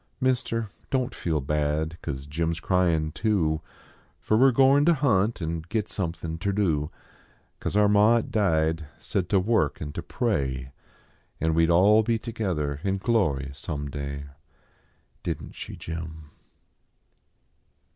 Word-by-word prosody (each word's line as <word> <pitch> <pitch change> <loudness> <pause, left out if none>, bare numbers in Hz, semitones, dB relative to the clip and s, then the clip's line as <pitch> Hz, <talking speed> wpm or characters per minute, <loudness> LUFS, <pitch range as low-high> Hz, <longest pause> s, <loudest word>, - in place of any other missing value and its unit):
Mister, 120 -4 0 0.2
don 130 -2 +1
t - - -13
feel 80 -4 -1
bad 75 +3 -1
cause 70 -3 -5
Jim 80 +3 -1
s 85 0 -2
cryin 85 -3 +1
too; 80 -8 +1 0.6
Fer 110 - +1
we 130 +5 +6
re - - +5
goin 135 +3 +5
ter 170 +2 +5
hunt 115 - +1
an 80 0 -3
git 110 -1 -1
somethin 80 -3 -3
ter 100 +2 0
do; 80 -7 +1 0.7
Cause - - -3
our 105 0 +5
ma 105 +3 +5
at 115 - -1
died 80 -6 +1
said 95 -4 -2
ter 100 - +3
work 95 -6 +1
an 75 -1 -5
ter 85 - -4
pray, 70 - -2 0.7
An 80 +1 +1
we 80 0 +4
d - - +2
all 100 +6 +6
be 115 +1 +1
together 90 - -3
in 95 0 0
glory 90 - +1
some 70 -1 -5
day 70 0 -5 1.0
Didn - - -4
t - - -15
she, - - -7
Jim? 80 -2 -7
85 Hz, 155 wpm, -26 LUFS, 75-110 Hz, 1.0 s, we